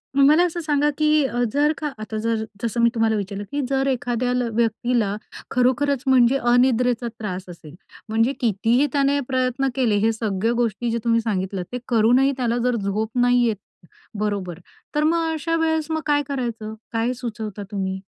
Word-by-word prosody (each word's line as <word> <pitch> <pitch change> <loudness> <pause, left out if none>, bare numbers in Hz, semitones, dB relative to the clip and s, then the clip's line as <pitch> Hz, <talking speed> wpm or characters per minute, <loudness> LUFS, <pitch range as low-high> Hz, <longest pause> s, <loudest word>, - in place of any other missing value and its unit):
मग 275 - +5
मला 315 +4 +5
असं 345 0 -3
सांगा 295 -1 +1
की 305 -1 +3
अ, 245 -1 -1
जर 295 +2 +3
का 300 -2 -3
आता 215 0 -5
जर 225 -1 0 0.2
जसं 235 +1 -1
मी 235 - +5
तुम्हाला 225 -1 +2
विचारलं 200 0 -4
की 285 0 -1
जर 270 0 +1
एखाद्याला 245 -1 0
व्यक्तीला 230 -2 0 0.4
खरोखरंच 260 +2 +1
म्हणजे 260 0 +5
अनिद्रेचा 245 -1 +2
त्रास 190 -3 -4
असेल 165 -2 -12 0.3
म्हणजे 225 +5 +2
कितीही 235 +5 +2
त्याने 280 0 +2
प्रयत्न 255 +1 0
केले, 240 -6 +2
हे 220 +2 +2
सगळ्या 215 0 -1
गोष्टी 235 0 -1
जे 235 - 0
तुम्ही 230 -1 +2
सांगितलत, 190 -4 -2
ते 250 - -3
करूनही 245 +4 +4
त्याला 240 -1 0
जर 250 -1 +2
झोप 210 +1 -2
नाही 245 0 +4
येत, 220 - 0 0.6
बरोबर 195 -5 -2 0.4
तर 300 - +2
मग 325 +1 +1
अशा 330 +2 -1
वेळेस 320 -1 0
मग 315 0 -1
काय 290 -1 +2
करायचं? 235 -5 -4 0.2
काय 230 +2 0
सुचवता 220 -4 -6
तुम्ही? 190 -1 -3
240 Hz, 170 wpm, -22 LUFS, 220-275 Hz, 0.6 s, मग